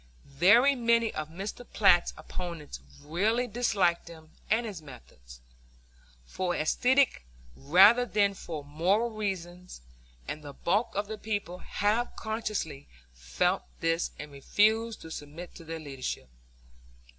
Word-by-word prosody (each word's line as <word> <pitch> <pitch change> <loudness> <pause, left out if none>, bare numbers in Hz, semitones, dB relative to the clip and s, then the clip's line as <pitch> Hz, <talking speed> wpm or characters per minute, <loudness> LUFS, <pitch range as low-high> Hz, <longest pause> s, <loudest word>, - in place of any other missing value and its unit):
Very 205 - +5
many 235 -2 +2
of 155 0 -4
Mr. 195 +8 -6
Platt's 175 -4 +5
opponents 170 -5 -7 0.2
really 210 +11 +1
disliked 205 -9 +1
him 160 -2 -13 0.2
and 230 +2 +2
his 200 -7 -6
methods, 65 - -14 0.8
for 180 - -2
aesthetic 250 - +2 0.3
rather 190 - +6
than 205 -4 +1
for 160 -6 -7
moral 185 +11 +1
reasons, 180 - -5 0.5
and 155 - -5
the 145 -1 -8
bulk 205 - 0
of 205 +1 0
the 215 0 -6
people 205 -5 -4
half 215 +6 -1
consciously 215 -10 -4 0.3
felt - - 0 0.2
this 165 +1 0
and 150 0 -8
refused 215 +10 +1
to 160 - -10
submit 155 +4 -8
to 165 - -12
their 165 0 -6
leadership. 135 - -6
180 Hz, 125 wpm, -29 LUFS, 155-220 Hz, 0.8 s, rather